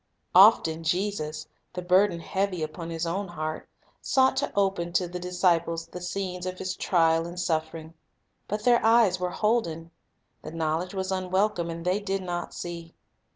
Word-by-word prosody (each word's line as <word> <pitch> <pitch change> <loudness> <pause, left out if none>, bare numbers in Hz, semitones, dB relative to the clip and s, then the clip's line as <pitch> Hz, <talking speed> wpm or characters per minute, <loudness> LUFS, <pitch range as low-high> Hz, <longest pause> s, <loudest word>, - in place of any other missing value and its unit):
Often 160 0 +6
Jesus, 160 -3 -2 0.3
the 180 0 -5
burden 180 -1 +3
heavy 190 -2 -2
upon 160 +2 -6
His 165 0 -3
own 190 +4 -2
heart, 155 -2 -5 0.3
sought 265 0 +3
to - - -1
open 195 -4 0
to 180 0 +1
the 180 +1 -6
disciples 170 -2 0
the 180 +2 -9
scenes 180 0 -4
of 185 0 -5
His 185 0 -4
trial 165 -2 +2
and 175 +1 -7
suffering. 160 -1 -2 0.5
But 210 +1 -3
their 240 0 +4
eyes 225 -5 +4
were 180 0 -1
holden. 175 -6 -1 0.5
The - - -8
knowl 160 0 0
edge 180 +2 -7
was 190 0 -2
unwelcome, 185 -1 0
and 165 0 -6
they 185 +3 +1
did 195 -2 -3
not 175 -1 -4
see. 170 -1 -7
180 Hz, 165 wpm, -26 LUFS, 165-190 Hz, 0.5 s, Often